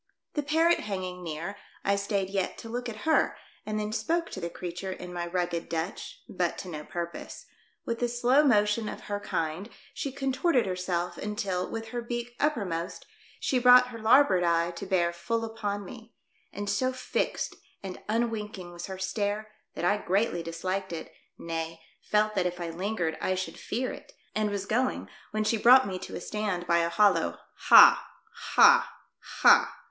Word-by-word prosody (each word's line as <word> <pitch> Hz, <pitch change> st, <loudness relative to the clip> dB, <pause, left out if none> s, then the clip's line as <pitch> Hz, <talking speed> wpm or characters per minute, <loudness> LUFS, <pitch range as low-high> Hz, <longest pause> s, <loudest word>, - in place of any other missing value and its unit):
The 295 Hz, -, 0 dB
parrot 320 Hz, +4 st, +3 dB
hanging 185 Hz, -3 st, -5 dB
near, 170 Hz, +5 st, -5 dB, 0.3 s
I 200 Hz, -, +2 dB
stayed 200 Hz, -1 st, -1 dB
yet 195 Hz, -2 st, -1 dB
to 225 Hz, -, -9 dB
look 245 Hz, +1 st, -3 dB
at 220 Hz, +4 st, -8 dB
her 315 Hz, -, +2 dB, 0.3 s
and 215 Hz, 0 st, -1 dB
then 210 Hz, 0 st, -3 dB
spoke 330 Hz, +10 st, -1 dB
to 190 Hz, -, -6 dB
the 170 Hz, -, -3 dB
creature 180 Hz, +2 st, -6 dB
in 180 Hz, -1 st, -7 dB
my 175 Hz, -1 st, -3 dB
rugged 175 Hz, -1 st, -2 dB
Dutch, 175 Hz, -, -4 dB
but -, -, -1 dB
to 185 Hz, -, -7 dB
no 150 Hz, -3 st, -6 dB
purpose; 170 Hz, +2 st, -6 dB, 0.4 s
with 230 Hz, 0 st, -2 dB
the 245 Hz, -, +1 dB
slow 245 Hz, +4 st, +3 dB
motion 210 Hz, -4 st, +3 dB
of -, -, -7 dB
her 205 Hz, 0 st, -4 dB
kind 165 Hz, +2 st, -3 dB, 0.2 s
she 275 Hz, -, -4 dB
contorted 270 Hz, +1 st, +1 dB
herself 180 Hz, -2 st, -2 dB
until, 200 Hz, -3 st, -2 dB
with 225 Hz, 0 st, -5 dB
her 240 Hz, +1 st, -3 dB
beak 240 Hz, 0 st, -5 dB
uppermost, 195 Hz, -, -2 dB, 0.3 s
she 255 Hz, -, +1 dB
brought 250 Hz, 0 st, +7 dB
her 230 Hz, -2 st, -8 dB
larboard 220 Hz, -5 st, +5 dB
eye 170 Hz, 0 st, +2 dB
to 175 Hz, +3 st, -7 dB
bear 175 Hz, -3 st, +1 dB
full 225 Hz, +7 st, -2 dB
upon 205 Hz, -3 st, -4 dB
me; 225 Hz, +3 st, -12 dB, 0.4 s
and 205 Hz, 0 st, -5 dB
so 255 Hz, +6 st, +1 dB
fixed 255 Hz, 0 st, -2 dB, 0.3 s
and 190 Hz, -2 st, -7 dB
unwinking 215 Hz, -5 st, -2 dB
was 175 Hz, 0 st, -7 dB
her 190 Hz, -1 st, -6 dB
stare 205 Hz, +2 st, -2 dB, 0.2 s
that -, -, -2 dB
I 205 Hz, +3 st, +3 dB
greatly 195 Hz, -2 st, 0 dB
disliked 185 Hz, +3 st, -3 dB
it, 165 Hz, -1 st, -7 dB, 0.2 s
nay, 165 Hz, 0 st, -4 dB, 0.3 s
felt 215 Hz, 0 st, +2 dB
that 185 Hz, -3 st, +1 dB
if 180 Hz, 0 st, -5 dB
I 170 Hz, -1 st, -4 dB
lingered 175 Hz, -2 st, -2 dB
I 185 Hz, -, 0 dB
should 185 Hz, 0 st, -5 dB
fear 250 Hz, +3 st, -2 dB
it, -, -, -12 dB, 0.2 s
and 215 Hz, -1 st, 0 dB
was 200 Hz, -1 st, -3 dB
going 250 Hz, +5 st, -1 dB, 0.2 s
when 215 Hz, 0 st, -1 dB
she 225 Hz, +2 st, +1 dB
brought 255 Hz, +4 st, +7 dB
me 185 Hz, -2 st, -4 dB
to -, -, -8 dB
a -, -, -5 dB
stand 205 Hz, -5 st, -3 dB
by 170 Hz, -1 st, +3 dB
a 170 Hz, 0 st, +1 dB
hollow 170 Hz, -, +3 dB, 0.3 s
"Ha! -, -, +9 dB, 0.5 s
ha! -, -, +7 dB, 0.5 s
ha!" -, -, +6 dB
205 Hz, 180 wpm, -28 LUFS, 175-230 Hz, 0.5 s, Ha